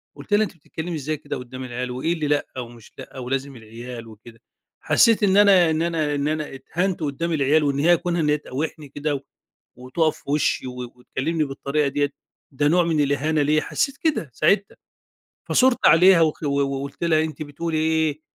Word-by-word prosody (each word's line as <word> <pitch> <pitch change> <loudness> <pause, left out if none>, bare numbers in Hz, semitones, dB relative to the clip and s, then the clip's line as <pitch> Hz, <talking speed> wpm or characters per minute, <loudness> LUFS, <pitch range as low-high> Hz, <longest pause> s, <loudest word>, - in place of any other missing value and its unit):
قُلت 205 - -7
لها 215 +1 +5
أنتِ 200 - -5
بتتكلّمي 165 +2 -6
إزاي 155 +1 -3
كده - - -6
قُدّام 130 +1 -8
العيال، 125 0 -4
و 125 - -5
إيه 165 +4 +1
اللي 155 -3 -2
لأ 145 -3 -1
و 120 - -5
مش 115 -2 -15
لأ؟ - - -11
ولازم 135 +2 -3
العيال 115 +1 -9
وكده؟ 115 +1 -15 0.4
حسّيت 225 -2 +4
إن 195 0 +4
أنا 195 -5 +6
إن 155 - 0
أنا 160 -3 0
إن 145 +1 -1
أنا 155 -2 -3
اتهنت 180 +6 -2
قُدّام 160 +4 -2
العيال، 150 +1 +3
وإن 140 -1 0
هي 170 +3 +5
كونها 175 -1 -1
إن 150 - +1
هي 150 - +3
تقاوحني 150 +1 -5
كده، 145 -1 -3 0.5
وتُقف 130 +6 -1
في - - -21
وشّي 145 -3 0
و 125 - -6 0.2
وتكلِّمني 150 +6 -2
بالطريقة 140 +1 -1
ديَّة، 145 +1 0 0.4
ده 145 +2 +1
نوع 175 +3 +4
من 165 -3 +1
الإهانة 145 +2 0
ليَّ، 150 +2 +2
حسّيت 275 -1 -2
كده 295 - -1
ساعتها، 195 - +1 0.7
فثُرت 260 -1 +4
عليها 175 +3 +7
و 155 -2 +3
و 140 0 +1
وقُلت 140 +2 -3
لها 160 -2 +3
أنتِ 155 0 -6
بتقولي 155 +2 -4
إيه؟ 155 -1 0
150 Hz, 195 wpm, -23 LUFS, 135-165 Hz, 0.7 s, عليها